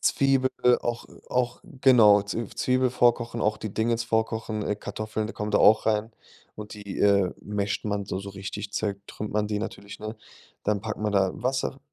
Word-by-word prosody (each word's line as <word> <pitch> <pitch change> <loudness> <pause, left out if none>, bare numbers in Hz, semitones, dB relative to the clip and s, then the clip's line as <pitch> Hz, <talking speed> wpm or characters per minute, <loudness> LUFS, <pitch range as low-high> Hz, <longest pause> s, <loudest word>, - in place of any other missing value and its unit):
Zwiebel 135 -1 +2 0.3
auch 120 -1 -3 0.2
auch 125 -1 0 0.2
genau, 105 -6 +7
Z 105 +2 -5
Zwiebel 130 0 +2
vorkochen, 120 -1 +2
auch 105 +1 +1
die 105 -2 -6
Dings 115 +1 0
vorkochen, 110 -1 -1
äh, 105 - -1
Kartoffeln, 110 0 -4
die 115 - -6
kommen 105 0 -4
da 105 - +3
auch 110 +1 +5
rein 110 +1 +1 0.4
und 105 0 -8
die, 100 -2 -7
äh, 100 -2 +4
masht 100 0 -2
man 100 -1 -1
so 95 - -4
so 100 0 -7
richtig 100 +1 -6
zertrümmert 100 0 -4
man 105 0 +1
die 105 -1 -1
natürlich, 100 -2 -7
ne? 110 +1 -6 0.5
Dann 105 -1 0
packt 110 +1 -5
man 105 -1 -1
da 95 -2 +3
Wasser 130 +2 -2
105 Hz, 180 wpm, -26 LUFS, 105-115 Hz, 0.5 s, genau